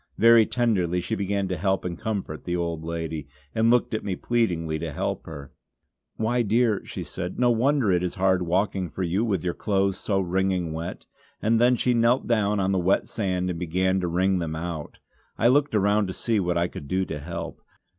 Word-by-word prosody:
Very 115 0 +6
tenderly 95 -8 +1
she 90 - -4
began 100 0 -1
to 90 - -2
help 95 +2 0
and 90 -1 -3
comfort 95 -5 -4
the 90 - -1
old 85 -2 -2
lady, 80 -3 -4 0.3
and 110 +1 +3
looked 120 -1 +3
at 110 - -2
me 95 -3 -2
pleadingly 85 -10 0
to 80 0 -4
help - - -3
her. 70 -4 -9 0.6
"Why 120 +3 +1
dear" 115 -1 +2
she - - -6
said 90 +1 -6
"no 125 -1 +3
wonder 125 -1 +2
it 90 -1 +2
is 90 -1 -2
hard 95 -1 +2
walking 90 +1 0
for 95 - -4
you 90 +5 0
with 100 -7 -1
your 90 -1 -1
clothes 100 -2 0
so 100 -2 0
wringing 95 -2 0
wet," 85 +3 -6 0.3
and 115 +2 +3
she 125 - +2
knelt 120 +2 +3
down 105 -3 +1
on 95 0 +1
the 95 - +2
wet 90 +2 +2
sand 90 -3 -1
and 85 - -5
began 95 +2 +1
to 90 - -1
wring 90 +2 +1
them 80 -2 -3
out. 80 -2 -5 0.4
I 115 - +4
looked 145 0 +2
around 100 0 +2
to 95 - -4
see 115 +1 0
what 90 -2 0
I 85 +1 +2
could 70 - -9
do 95 +4 0
to 75 - -5
help. 85 +2 -6
95 Hz, 205 wpm, -25 LUFS, 85-110 Hz, 0.6 s, Very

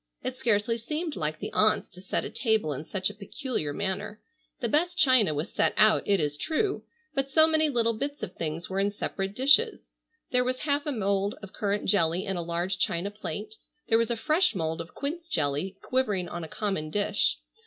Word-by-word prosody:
It 255 - -3
scarcely 230 -2 +1
seemed 305 +6 -3
like 155 0 -2
the - - -6
aunts 215 0 +3
to 180 - -13
set 190 - -2
a - - -5
table 220 - +1
in 150 +3 -6
such 190 +3 -1
a - - -13
peculiar 210 - -3
manner. 200 +5 -3 0.4
The 245 - 0
best 345 +8 +1
china 255 - +5
was 150 +4 -3
set - - +2
out, 215 0 +6
it 200 -1 +3
is 145 -1 -1
true, 390 - -1 0.3
but 275 -1 -1
so 315 +3 +6
many 315 -1 +3
little 230 -4 +2
bits 285 +6 -4
of - - -4
things 165 +1 -4
were 190 +1 -2
in 200 +1 +2
separate 195 -1 -4
dishes. 285 - +3 0.4
There 250 -1 +4
was 255 0 -2
half 290 0 0
a - - +1
mould 200 -3 0
of 200 - -9
currant 205 0 -1
jelly 175 -1 +2
in 195 -2 -2
a 175 - -1
large 175 +2 -2
china 180 +4 0
plate, 210 0 -6 0.4
there 225 - +5
was 230 - +1
a 235 - 0
fresh 310 - +2
mould 160 -1 -1
of 165 - -11
quince 325 +4 -4
jelly 155 - -1
quivering 210 -9 0
on 175 - -5
a - - -5
common 195 -4 -2
dish. 205 +3 +1
210 Hz, 205 wpm, -28 LUFS, 180-260 Hz, 0.4 s, out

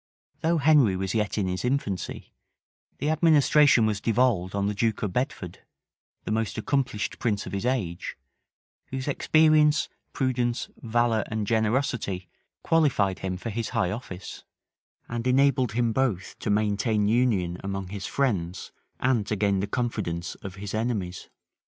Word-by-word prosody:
Though 165 +1 +1
Henry 140 -9 +5
was 95 0 -2
yet 105 -2 0
in 100 -3 0
his 90 0 -3
infancy, 125 -7 -2 0.6
the 150 +3 0
administration 150 -5 +5
was 105 -2 -1
devolved 110 -5 +1
on 100 0 0
the 105 - 0
duke 110 +1 0
of 100 -4 -2
Bedford, 125 - -3 0.6
the - - -4
most 110 -1 -1
accomplished 125 -2 -1
prince 105 -4 -1
of - - -8
his 100 +4 -1
age; 100 -10 -2 0.7
whose 130 +1 -5
experience, 150 0 +4 0.2
prudence, 125 -3 -1
valor, 115 -2 +1
and 110 -1 -2
generosity 110 -4 0 0.4
qualified 130 - +2
him 95 -1 -3
for 115 +5 -5
his 115 +1 -3
high 110 -7 0
office, 95 -4 -7 0.6
and 115 +1 -3
enabled 130 -2 +3
him 115 -1 +1
both 110 -8 -1
to - - -3
maintain 105 +1 +1
union 105 -7 +1
among 95 -1 -4
his 100 -1 -5
friends, 95 -11 -1 0.3
and 125 -5 +1
to 105 - 0
gain 100 -1 +1
the 100 - -1
confidence 100 -8 -2
of 95 -2 -7
his 100 0 -6
enemies. 110 -6 -2
110 Hz, 145 wpm, -26 LUFS, 100-130 Hz, 0.7 s, Henry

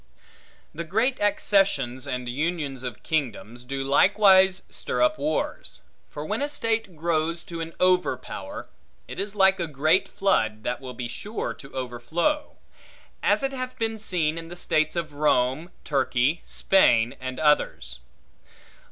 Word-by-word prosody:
The 170 - -4
great 220 +10 0
accessions 195 -11 +1
and 125 -2 -3
unions 145 0 -2
of 125 -4 -7
kingdoms, 125 -6 -3
do 135 +2 -4
likewise 190 +6 +5
stir - - -3
up 310 0 +3
wars; 305 - -2 0.3
for - - -6
when - - -2
a 290 - 0
state 225 - -2
grows 165 +1 -1
to 170 -1 -6
an 165 0 -6
over 180 0 +3
power, - - -8 0.4
it - - -7
is 205 +1 -4
like 190 -1 +5
a 170 - -1
great 155 +5 +2
flood, 110 - 0
that 125 +2 -2
will 130 -2 -8
be 120 0 -4
sure 210 - -4
to 135 - -14
overflow. 130 - -2 0.7
As - - +2
it 270 0 -1
hath 255 -1 -5
been 225 -1 -2
seen 165 -6 0
in 165 - -9
the 175 - -9
states 155 -2 0
of 165 -3 -3
Rome, 145 +1 +1
Turkey, 135 +1 +1
Spain, 120 -12 +3
and 130 0 -5
others. 65 - +1
160 Hz, 150 wpm, -25 LUFS, 130-195 Hz, 0.7 s, likewise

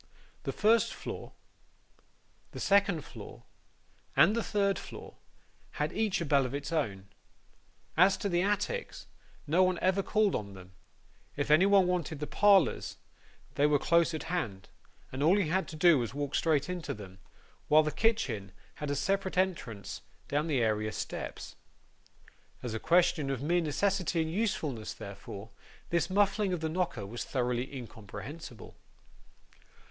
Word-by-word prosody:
The - - -1
first 225 +2 +3
floor, - - -7 1.2
the - - -7
second 200 -6 +2
floor, - - -11 0.7
and 210 - +6
the 230 - +1
third 200 -2 +1
floor, - - -10 0.6
had - - -2
each 215 -3 0
a - - -1
bell 140 -2 +3
of 130 +1 -3
its 140 +1 -5
own. 100 -12 -2 0.9
As 185 +4 +5
to 210 - -2
the 175 -2 +1
attics, 205 - -2 0.4
no 165 +5 +3
one 185 -1 +3
ever 190 +1 +2
called 210 0 +2
on 100 -2 -4
them; 95 0 -13 0.6
if 145 +1 -1
anybody 190 +4 +6
wanted 175 -4 -1
the 150 - -2
parlours, 195 - +3 0.6
they 145 - +3
were 150 -1 +4
close 170 +2 +2
at 155 - -4
hand, 110 - -3 0.4
and 130 - -5
all 170 +7 +5
he 190 -7 +1
had 190 +3 0
to 160 - -8
do 160 -2 +5
was 120 -2 -2
to 140 - -10
walk 145 -1 -3
straight 150 -4 +2
into 180 -3 -4
them; 95 -3 -11 0.5
while 155 +1 +6
the 150 - -1
kitchen 135 - 0 0.3
had 150 - -2
a 145 - 0
separate 190 +5 -1
entrance 160 - -2 0.3
down 145 +3 0
the 135 -7 +1
area 110 -1 0
steps. - - -6 1.1
As 120 -3 -3
a 110 - -2
question 170 -2 +3
of 135 -1 -2
mere 175 +3 +2
necessity 180 +2 0
and 160 - -4
usefulness, 165 - -2
therefore, 100 +1 -9 0.4
this 170 0 +1
muffling 200 0 +2
of 180 - -1
the 160 0 -2
knocker 160 - -2
was 115 +5 -5
thoroughly 125 -1 -1
incomprehensible. 125 +1 -9
160 Hz, 155 wpm, -31 LUFS, 130-190 Hz, 1.2 s, and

